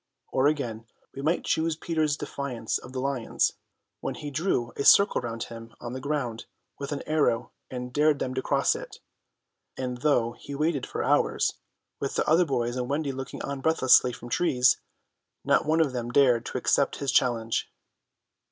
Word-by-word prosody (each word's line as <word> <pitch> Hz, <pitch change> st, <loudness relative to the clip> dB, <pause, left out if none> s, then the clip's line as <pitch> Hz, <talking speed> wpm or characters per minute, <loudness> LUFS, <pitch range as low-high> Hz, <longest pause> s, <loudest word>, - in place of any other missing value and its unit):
Or 135 Hz, +1 st, +3 dB
again, 120 Hz, -7 st, -2 dB, 0.3 s
we 135 Hz, -, -6 dB
might 160 Hz, +5 st, +1 dB
choose 160 Hz, 0 st, +1 dB
Peter's 155 Hz, -2 st, 0 dB
defiance 125 Hz, -8 st, -3 dB
of 125 Hz, -, -12 dB
the 130 Hz, -, -4 dB
lions, 130 Hz, -3 st, 0 dB, 0.5 s
when -, -, -4 dB
he 145 Hz, -, -6 dB
drew 140 Hz, -6 st, -1 dB
a -, -, -2 dB
circle 200 Hz, +3 st, +6 dB
round 115 Hz, -1 st, -4 dB
him 115 Hz, 0 st, -10 dB
on 120 Hz, 0 st, -6 dB
the 130 Hz, -, -4 dB
ground 135 Hz, -6 st, -3 dB, 0.3 s
with 140 Hz, 0 st, -5 dB
an 145 Hz, -, -3 dB
arrow 150 Hz, -6 st, +1 dB, 0.2 s
and 125 Hz, -1 st, -6 dB
dared 150 Hz, +1 st, +3 dB
them 130 Hz, -1 st, -3 dB
to 130 Hz, -, -1 dB
cross 140 Hz, +1 st, +2 dB
it; -, -, -8 dB, 0.8 s
and 125 Hz, -1 st, -3 dB
though 125 Hz, -6 st, +2 dB
he 140 Hz, +4 st, -9 dB
waited 150 Hz, -2 st, 0 dB
for -, -, -3 dB
hours, -, -, +2 dB, 0.5 s
with 140 Hz, -, -3 dB
the -, -, 0 dB
other 165 Hz, +3 st, +5 dB
boys 120 Hz, -4 st, -1 dB
and 125 Hz, 0 st, -3 dB
Wendy 145 Hz, 0 st, -1 dB
looking 135 Hz, 0 st, -6 dB
on 140 Hz, -1 st, -4 dB
breathlessly 130 Hz, -5 st, +5 dB
from 120 Hz, 0 st, -9 dB
trees, 130 Hz, -5 st, +3 dB, 0.6 s
not -, -, +3 dB
one 160 Hz, +1 st, +3 dB
of 150 Hz, -5 st, +2 dB
them 120 Hz, -1 st, -3 dB
dared 125 Hz, -2 st, +3 dB
to -, -, -3 dB
accept -, -, +2 dB
his 140 Hz, -2 st, -1 dB
challenge. 115 Hz, -2 st, +1 dB
135 Hz, 180 wpm, -27 LUFS, 125-150 Hz, 0.8 s, circle